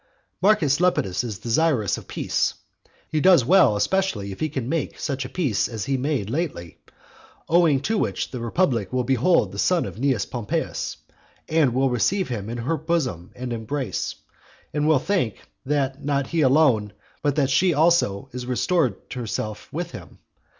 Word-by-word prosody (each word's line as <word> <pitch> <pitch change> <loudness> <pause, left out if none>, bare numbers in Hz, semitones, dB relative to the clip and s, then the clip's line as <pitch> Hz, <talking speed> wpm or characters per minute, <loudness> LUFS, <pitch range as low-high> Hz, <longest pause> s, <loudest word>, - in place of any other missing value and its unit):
Marcus 185 -9 +3
Lepidus 125 - +1
is 110 -5 -4
desirous 120 - +1
of - - -10
peace. - - -1 0.6
He 155 - +1
does 180 -9 +6
well 180 - +5
especially 105 - 0
if 95 - -9
he 155 - -1
can 130 -5 -4
make 155 0 -2
such 135 -2 -3
a - - -6
peace 135 - 0
as 110 -4 -5
he 135 - 0
made 130 -5 -1
lately, 130 - -4 0.7
owing 165 -5 +4
to 215 +8 0
which - - -2
the 125 - -5
republic 115 - 0
will 130 0 0
behold 130 - +2
the 100 - -7
son 180 - +2
of - - -7
Cnaeus 130 -6 +1
Pompeius, 120 -4 -3 0.5
and 155 -6 +2
will 135 0 +2
receive 180 - +1
him 110 -4 -4
in 120 - -4
her 135 +8 -1
bosom 145 - -2
and 125 -1 -4
embrace; 115 -1 -3 0.6
and 150 +1 0
will 155 -2 +5
think, 155 - 0 0.3
that 140 -1 -1
not 140 -1 0
he 165 +3 -1
alone, 130 -7 +3 0.3
but 145 -2 +1
that 140 -3 +1
she 180 +6 +4
also 150 - +2
is 125 -1 -6
restored 130 - 0
to 125 - -5
herself 110 -2 -4
with - - -4
him. - - -11
135 Hz, 170 wpm, -23 LUFS, 115-160 Hz, 0.7 s, does